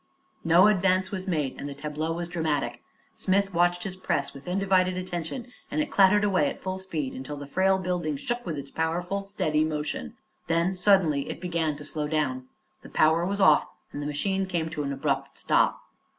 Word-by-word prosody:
No 170 +3 +6
advance 190 -2 +3
was 190 -1 -4
made 150 -7 -1
and 145 - -5
the 140 - -7
tableau 150 +2 -3
was 170 +1 -3
dramatic. 145 -8 -2 0.3
Smith 195 0 +1
watched 175 +1 +2
his 190 -1 -4
press 145 -6 -1
with 140 +3 -12
undivided 185 -1 +2
attention 185 +7 -5 0.2
and - - -2
it 300 - -1
clattered 200 +1 +5
away 185 -8 +3
at - - -7
full 185 0 -3
speed 155 -8 -4
until 140 +3 -6
the 145 - -7
frail 190 +6 +2
building 175 -5 -2
shook 240 - -3
with 165 -8 -4
its 140 0 -7
powerful, 175 +4 -1
steady 155 -6 0
motion. 150 - -3 0.3
Then 170 +3 +1
suddenly 180 -7 +3
it - - -5
began 165 -4 -1
to 145 0 -9
slow 150 0 -2
down. 130 -5 -1 0.3
The - - -12
power 160 +3 +3
was 200 +1 -2
off, 170 -6 +5 0.2
and 145 - -5
the 145 - -3
machine 190 +6 -1
came 170 -3 -1
to 150 - -3
an 140 -1 -2
abrupt 140 0 -2
stop. - - +2
170 Hz, 195 wpm, -27 LUFS, 150-190 Hz, 0.3 s, No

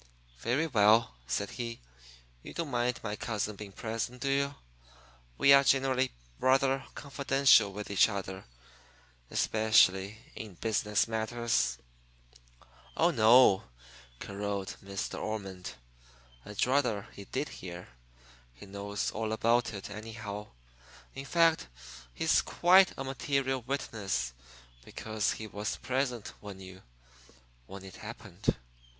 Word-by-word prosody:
"Very 130 - +1
well," 110 -4 +4
said 80 +11 -2
he. 115 -2 -5 0.6
"You - - -10
don't 165 -4 -3
mind 120 0 0
my 105 -2 -3
cousin 105 -1 -3
being 100 0 -9
present, 115 +5 -4
do 135 +1 0
you? 140 +1 0 0.8
We 140 - +7
are 140 0 +7
generally 130 -1 +2 0.3
rather 135 +1 +2
confidential 135 -6 +4
with 105 +1 -6
each 100 - +5
other 95 -2 -5 0.8
especially 105 -2 +3 0.2
in 105 -5 -8
business 105 +2 +1
matters." 110 - 0 1.2
"Oh - - +4
no," 110 -3 +6 0.5
caroled 100 -1 -4
Miss 100 -1 -4
De - - -6
Ormond. 95 -4 -5 0.7
"I'd 105 - 0
rather 125 -6 +1
he 100 - -10
did 135 +6 -3
hear. 90 -1 -9 0.7
He 60 - -12
knows 100 +1 -3
all 110 0 -3
about 115 +2 +2
it, 100 -1 -7
anyhow. 105 -1 -7 0.7
In 135 +1 -7
fact, 165 +1 +3 0.4
he's - - +2
quite 185 +2 +5
a - - -3
material 135 0 -1
witness 110 - -2 0.5
because 110 - -2
he 110 - -7
was 105 0 -4
present 125 -4 -2
when 100 -2 -9
you 95 0 -11 0.9
when 95 0 -9
it 95 - -11
happened. - - -3
110 Hz, 120 wpm, -31 LUFS, 100-130 Hz, 1.2 s, We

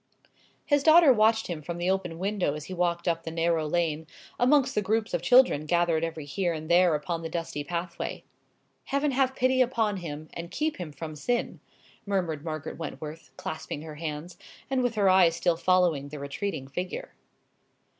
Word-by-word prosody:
His 290 -1 +3
daughter 315 -1 +7
watched 220 0 +3
him 170 -3 -5
from 170 +3 -5
the 175 +2 +1
open 180 -4 -2
window 190 -5 -1
as 150 -1 -7
he 185 - -7
walked 175 -1 -1
up 165 -1 +1
the 165 - -6
narrow 165 -1 0
lane, 160 -1 -1 0.3
amongst 265 +2 +4
the 210 - +1
groups 220 +2 -1
of - - 0
children 245 - +4
gathered 170 -1 +2
every 160 -2 -4
here 170 +5 -1
and 155 +1 -5
there 175 -2 +5
upon 165 +3 -3
the 165 - -5
dusty 165 -3 -4
pathway. 170 +2 -4 0.6
"Heaven 280 +1 0
have 265 0 +1
pity 255 +1 +3
upon 225 -5 +1
him, 155 -3 -6
and 170 0 -6
keep 310 - -2
him 175 -4 -6
from 155 +2 -7
sin!" 240 +10 -2 0.4
murmured 175 -7 -2
Margaret 155 -1 -5
Wentworth, 155 -2 -7
clasping 155 -1 -5
her 155 -2 -9
hands, 160 +2 -6 0.3
and 265 -1 +2
with 245 -2 0
her 205 -2 +3
eyes 185 -3 +5
still 175 0 +1
following 170 -5 +2
the 150 - -7
retreating 140 +1 -4
figure. 180 - -5
175 Hz, 180 wpm, -27 LUFS, 155-210 Hz, 0.6 s, daughter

